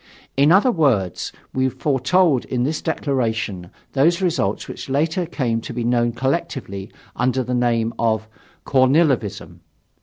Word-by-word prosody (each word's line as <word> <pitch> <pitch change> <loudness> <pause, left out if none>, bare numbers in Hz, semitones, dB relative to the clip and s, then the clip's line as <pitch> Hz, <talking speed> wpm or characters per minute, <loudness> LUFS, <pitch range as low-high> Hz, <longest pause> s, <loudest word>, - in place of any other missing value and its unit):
In 140 +3 +4
other 205 +8 +5
words, 120 - +1 0.2
we 130 0 +1
foretold 140 +2 +2
in 125 -1 -1
this 150 +4 -1
declaration 115 - -2 0.2
those 165 +6 +3
results 165 - -1
which - - -8
later 160 +5 0
came 120 -8 -1
to 120 - -7
be 120 0 -3
known 120 0 +2
collectively 130 - -3 0.2
under 130 +1 +1
the 125 +1 -3
name 120 -2 +1
of 110 -1 0 0.4
"Kornilovism." 130 - +2
130 Hz, 130 wpm, -21 LUFS, 115-150 Hz, 0.4 s, other